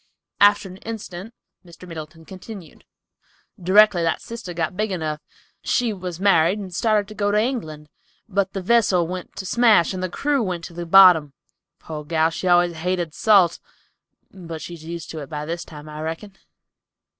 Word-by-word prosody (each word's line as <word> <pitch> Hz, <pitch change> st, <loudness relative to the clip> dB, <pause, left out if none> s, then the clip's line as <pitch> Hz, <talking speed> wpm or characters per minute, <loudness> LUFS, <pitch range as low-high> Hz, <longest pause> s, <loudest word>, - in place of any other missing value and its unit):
After 205 Hz, 0 st, +5 dB
an 185 Hz, 0 st, -11 dB
instant, 210 Hz, -2 st, -8 dB, 0.3 s
Mr. 175 Hz, 0 st, -14 dB
Middleton 160 Hz, -1 st, -9 dB
continued, 190 Hz, -1 st, -11 dB, 0.8 s
"Directly 190 Hz, 0 st, +5 dB
that 165 Hz, -, 0 dB
sister 230 Hz, -6 st, -8 dB
got 170 Hz, 0 st, -3 dB
big 215 Hz, +1 st, -1 dB
enough, 155 Hz, -4 st, -3 dB, 0.4 s
she 240 Hz, -3 st, 0 dB
was 180 Hz, -3 st, -6 dB
married 190 Hz, -1 st, +3 dB
and 190 Hz, -3 st, -7 dB
started 210 Hz, +1 st, +1 dB
to -, -, -8 dB
go 205 Hz, -1 st, -1 dB
to 205 Hz, -, +1 dB
England, 180 Hz, -, -3 dB, 0.4 s
but 195 Hz, -2 st, -1 dB
the 195 Hz, -, -4 dB
vessel 195 Hz, -5 st, +3 dB
went 180 Hz, +1 st, -7 dB
to 190 Hz, -, -6 dB
smash 220 Hz, -4 st, +4 dB
and 185 Hz, -, -4 dB
the 185 Hz, -, -2 dB
crew 285 Hz, +8 st, 0 dB
went 180 Hz, -5 st, -3 dB
to 170 Hz, -, -9 dB
the 170 Hz, 0 st, -6 dB
bottom. 170 Hz, -6 st, +7 dB, 0.4 s
Poor 155 Hz, -2 st, -8 dB
gal, 160 Hz, +1 st, +1 dB
she 185 Hz, -, -4 dB
always 175 Hz, -1 st, +3 dB
hated 175 Hz, -1 st, -2 dB
salt, 195 Hz, -6 st, +4 dB, 0.7 s
but 165 Hz, -4 st, -8 dB
she's 170 Hz, 0 st, -9 dB
used 170 Hz, 0 st, -7 dB
to 160 Hz, -, -6 dB
it 140 Hz, -3 st, -8 dB
by 150 Hz, 0 st, -5 dB
this 170 Hz, +2 st, -4 dB
time, 150 Hz, -1 st, -12 dB
I 150 Hz, 0 st, -8 dB
reckon. 165 Hz, +6 st, -6 dB
180 Hz, 175 wpm, -22 LUFS, 165-205 Hz, 0.8 s, bottom